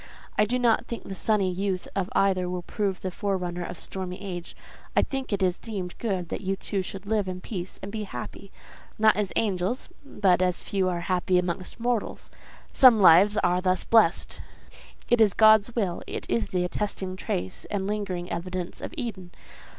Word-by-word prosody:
I 210 Hz, -, +4 dB
do 245 Hz, +4 st, 0 dB
not 240 Hz, -3 st, +2 dB
think 235 Hz, -, -5 dB
the 195 Hz, -, -7 dB
sunny 195 Hz, -1 st, +1 dB
youth 185 Hz, 0 st, -2 dB
of 195 Hz, -2 st, -1 dB
either 185 Hz, -2 st, +2 dB
will 180 Hz, -1 st, -4 dB
prove 195 Hz, -1 st, -2 dB
the 185 Hz, -, -3 dB
forerunner 180 Hz, -2 st, -2 dB
of 175 Hz, 0 st, -6 dB
stormy 185 Hz, 0 st, -5 dB
age. 175 Hz, -4 st, -7 dB, 0.4 s
I -, -, +5 dB
think 270 Hz, -3 st, -4 dB
it 200 Hz, -1 st, 0 dB
is 180 Hz, -1 st, +1 dB
deemed 195 Hz, -6 st, -5 dB
good 190 Hz, -7 st, -2 dB
that -, -, -4 dB
you 195 Hz, 0 st, -1 dB
two 195 Hz, 0 st, -3 dB
should 190 Hz, +1 st, -7 dB
live 210 Hz, -1 st, 0 dB
in 185 Hz, 0 st, -4 dB
peace 185 Hz, -2 st, -6 dB
and 195 Hz, -, -5 dB
be 215 Hz, -1 st, -4 dB
happy—not 200 Hz, -, -2 dB
as 205 Hz, -1 st, -1 dB
angels, 200 Hz, +3 st, -1 dB
but 190 Hz, -9 st, +2 dB
as 180 Hz, -1 st, 0 dB
few 190 Hz, -2 st, 0 dB
are 175 Hz, -1 st, -2 dB
happy 180 Hz, 0 st, +1 dB
amongst 180 Hz, +4 st, -2 dB
mortals. 240 Hz, -1 st, -2 dB, 0.4 s
Some 250 Hz, -4 st, +7 dB
lives 195 Hz, +3 st, +7 dB
are 180 Hz, +1 st, +2 dB
thus 185 Hz, 0 st, +1 dB
blessed: 225 Hz, -1 st, +3 dB, 0.7 s
it 240 Hz, -1 st, +3 dB
is 210 Hz, -4 st, +5 dB
God's 220 Hz, 0 st, +6 dB
will: 195 Hz, -7 st, -1 dB
it -, -, -5 dB
is 115 Hz, -3 st, 0 dB
the 180 Hz, -1 st, -1 dB
attesting 190 Hz, 0 st, -3 dB
trace 95 Hz, -, -4 dB
and 200 Hz, -2 st, -3 dB
lingering 195 Hz, -4 st, -3 dB
evidence 180 Hz, +1 st, -4 dB
of -, -, -6 dB
Eden. 205 Hz, -9 st, -5 dB
190 Hz, 180 wpm, -26 LUFS, 180-210 Hz, 0.7 s, Some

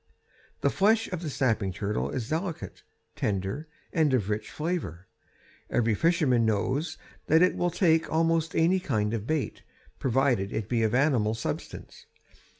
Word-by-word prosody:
The -, -, +2 dB
flesh 220 Hz, +3 st, +3 dB
of 180 Hz, -3 st, -3 dB
the 160 Hz, -, -3 dB
snapping 115 Hz, -8 st, 0 dB
turtle 95 Hz, -8 st, -2 dB
is 115 Hz, -, -3 dB
delicate, 165 Hz, +3 st, -4 dB, 0.3 s
tender, 100 Hz, -, -2 dB, 0.3 s
and 160 Hz, -4 st, +3 dB
of 105 Hz, -4 st, -1 dB
rich 105 Hz, +1 st, -3 dB
flavor. 150 Hz, -, -3 dB, 0.6 s
Every 115 Hz, -2 st, +2 dB
fisherman 150 Hz, -, +2 dB
knows 130 Hz, -, 0 dB, 0.3 s
that 160 Hz, +3 st, +5 dB
it 185 Hz, -, +3 dB
will 175 Hz, -, +1 dB
take 165 Hz, -2 st, +2 dB
almost 165 Hz, 0 st, +1 dB
any 175 Hz, +4 st, +3 dB
kind 110 Hz, -, -1 dB
of 110 Hz, -1 st, -3 dB
bait, 155 Hz, -2 st, -2 dB, 0.4 s
provided 130 Hz, -6 st, +1 dB
it 110 Hz, -3 st, -3 dB
be 120 Hz, -1 st, 0 dB
of 110 Hz, +1 st, +1 dB
animal 125 Hz, -6 st, +2 dB
substance. 110 Hz, -, -6 dB
135 Hz, 150 wpm, -27 LUFS, 110-165 Hz, 0.6 s, that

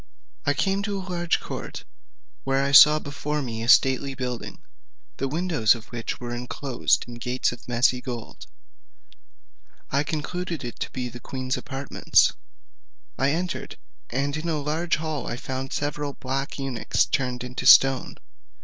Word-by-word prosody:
I 145 Hz, -, +3 dB
came 195 Hz, +5 st, +1 dB
to 200 Hz, -1 st, -2 dB
a 190 Hz, -1 st, -6 dB
large 175 Hz, -2 st, 0 dB
court, -, -, -7 dB, 0.6 s
where 135 Hz, 0 st, +1 dB
I 140 Hz, -, 0 dB
saw 150 Hz, +2 st, +9 dB
before 150 Hz, 0 st, -3 dB
me 115 Hz, -3 st, -4 dB
a 115 Hz, -, -3 dB
stately 135 Hz, +2 st, +4 dB
building, 125 Hz, -2 st, -5 dB, 0.6 s
the 135 Hz, -, -1 dB
windows 155 Hz, -, +2 dB
of 115 Hz, -1 st, -10 dB
which 120 Hz, -2 st, -4 dB
were 120 Hz, -1 st, -5 dB
inclosed 125 Hz, +1 st, 0 dB
with 120 Hz, -1 st, -10 dB
gates 125 Hz, +2 st, 0 dB
of 120 Hz, +1 st, -11 dB
messy 125 Hz, +1 st, +2 dB
gold: 120 Hz, -3 st, -7 dB, 1.4 s
I 140 Hz, -, +2 dB
concluded 160 Hz, +2 st, -3 dB
it 120 Hz, -, -7 dB
to -, -, -3 dB
be 125 Hz, -1 st, -4 dB
the 120 Hz, 0 st, -9 dB
queen's 130 Hz, +1 st, -3 dB
apartments. 135 Hz, -1 st, +2 dB, 0.9 s
I 135 Hz, +2 st, +3 dB
entered; 175 Hz, +4 st, -3 dB, 0.3 s
and 140 Hz, +3 st, -1 dB
in 160 Hz, +2 st, -3 dB
a 160 Hz, -, 0 dB
large 155 Hz, +4 st, 0 dB
hall 155 Hz, -4 st, -4 dB
I 120 Hz, -, -3 dB
found 130 Hz, +1 st, -5 dB
several 145 Hz, 0 st, -2 dB
black 135 Hz, +1 st, -4 dB
eunuchs 135 Hz, -4 st, 0 dB
turned 125 Hz, -2 st, -1 dB
into 125 Hz, +1 st, -3 dB
stone. 135 Hz, -1 st, +6 dB
135 Hz, 155 wpm, -25 LUFS, 125-150 Hz, 1.4 s, saw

